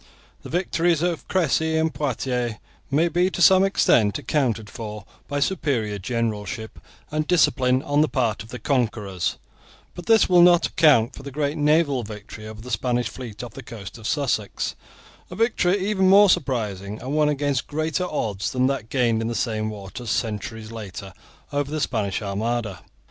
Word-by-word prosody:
The -, -, -10 dB
victories 170 Hz, -1 st, +1 dB
of 175 Hz, -2 st, -2 dB
Cressy 160 Hz, -2 st, +1 dB
and 160 Hz, 0 st, +1 dB
Poitiers 125 Hz, -4 st, -2 dB, 0.3 s
may 155 Hz, +5 st, +3 dB
be 175 Hz, +3 st, +2 dB
to 190 Hz, -, -6 dB
some 190 Hz, +1 st, +7 dB
extent 115 Hz, -, +3 dB
accounted 115 Hz, -8 st, -1 dB
for 105 Hz, -2 st, -7 dB, 0.2 s
by 145 Hz, 0 st, -2 dB
superior 130 Hz, -, -1 dB
generalship 110 Hz, 0 st, -3 dB, 0.3 s
and 155 Hz, 0 st, -1 dB
discipline 130 Hz, -7 st, +3 dB
on 145 Hz, +1 st, +2 dB
the 155 Hz, -, +3 dB
part 115 Hz, -6 st, 0 dB
of 110 Hz, -, -11 dB
the 125 Hz, -, -6 dB
conquerors; 110 Hz, -, -1 dB, 0.6 s
but 175 Hz, -, -10 dB
this 225 Hz, -2 st, +5 dB
will 180 Hz, -1 st, +6 dB
not 175 Hz, -1 st, +6 dB
account 135 Hz, -6 st, +4 dB
for -, -, -10 dB
the 140 Hz, -, -7 dB
great 145 Hz, +2 st, -2 dB
naval 150 Hz, -3 st, +2 dB
victory 105 Hz, 0 st, -9 dB
over 110 Hz, 0 st, -9 dB
the 125 Hz, +2 st, -9 dB
Spanish 120 Hz, -3 st, 0 dB
fleet 120 Hz, -4 st, -8 dB
off 120 Hz, -, -8 dB
the -, -, -8 dB
coast 110 Hz, 0 st, -9 dB
of 110 Hz, -, -6 dB
Sussex, 130 Hz, -7 st, -1 dB, 0.6 s
a 180 Hz, -, -8 dB
victory 205 Hz, -4 st, +2 dB
even 190 Hz, -1 st, +2 dB
more 200 Hz, 0 st, +7 dB
surprising 105 Hz, -, -2 dB
and 130 Hz, +3 st, -5 dB
won 150 Hz, -1 st, +3 dB
against 145 Hz, -3 st, -1 dB
greater 155 Hz, +3 st, -1 dB
odds 100 Hz, -9 st, -2 dB
than 130 Hz, 0 st, +1 dB
was -, -, +3 dB
that 110 Hz, -, -19 dB
gained 120 Hz, -4 st, +1 dB
in 115 Hz, -, -2 dB
the 115 Hz, -, -3 dB
same 110 Hz, -1 st, -1 dB
waters 105 Hz, +3 st, -7 dB
centuries 110 Hz, 0 st, -3 dB
later 100 Hz, -3 st, -8 dB, 0.4 s
over 145 Hz, -1 st, -1 dB
the 155 Hz, +1 st, -2 dB
Spanish 105 Hz, -7 st, -1 dB
Armada. 105 Hz, 0 st, -2 dB
125 Hz, 175 wpm, -23 LUFS, 110-155 Hz, 0.6 s, some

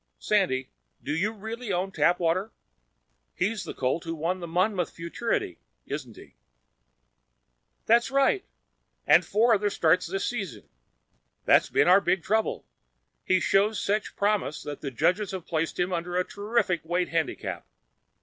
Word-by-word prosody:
Sandy, 155 Hz, -11 st, 0 dB, 0.3 s
do 145 Hz, -, -2 dB
you 200 Hz, +7 st, 0 dB
really 220 Hz, +1 st, -6 dB
own 185 Hz, +1 st, -1 dB
Tapwater? 180 Hz, +3 st, +1 dB, 0.9 s
He's 205 Hz, +3 st, -1 dB
the -, -, -7 dB
colt 135 Hz, +6 st, -1 dB
who 165 Hz, -1 st, -4 dB
won 170 Hz, +4 st, -2 dB
the 170 Hz, -, -6 dB
Monmouth 180 Hz, +1 st, 0 dB
Futurity, 235 Hz, -, -3 dB, 0.3 s
isn't -, -, -6 dB
he?" -, -, -14 dB, 1.5 s
"That's 235 Hz, +3 st, +4 dB
right. 275 Hz, +8 st, +2 dB, 0.6 s
And -, -, +6 dB
four 230 Hz, +3 st, +3 dB
other 205 Hz, -1 st, +2 dB
starts 170 Hz, -3 st, +2 dB
this 195 Hz, +3 st, -2 dB
season. 195 Hz, -, -4 dB, 0.8 s
That's -, -, +5 dB
been -, -, +3 dB
our 185 Hz, +3 st, +7 dB
big 190 Hz, -3 st, +1 dB
trouble. 220 Hz, +1 st, 0 dB, 0.6 s
He 185 Hz, -, +2 dB
shows 200 Hz, +4 st, +2 dB
such 210 Hz, +1 st, -1 dB
promise 205 Hz, -6 st, 0 dB
that 145 Hz, -1 st, -7 dB
the 140 Hz, -, -3 dB
judges 180 Hz, -, +1 dB
have 185 Hz, -3 st, -5 dB
placed 165 Hz, -1 st, -2 dB
him 180 Hz, +1 st, 0 dB
under 175 Hz, +1 st, -2 dB
a 180 Hz, -, +1 dB
terrific 205 Hz, -5 st, -1 dB
weight 175 Hz, +2 st, -1 dB
handicap. 165 Hz, -2 st, -3 dB
185 Hz, 145 wpm, -27 LUFS, 170-210 Hz, 1.5 s, our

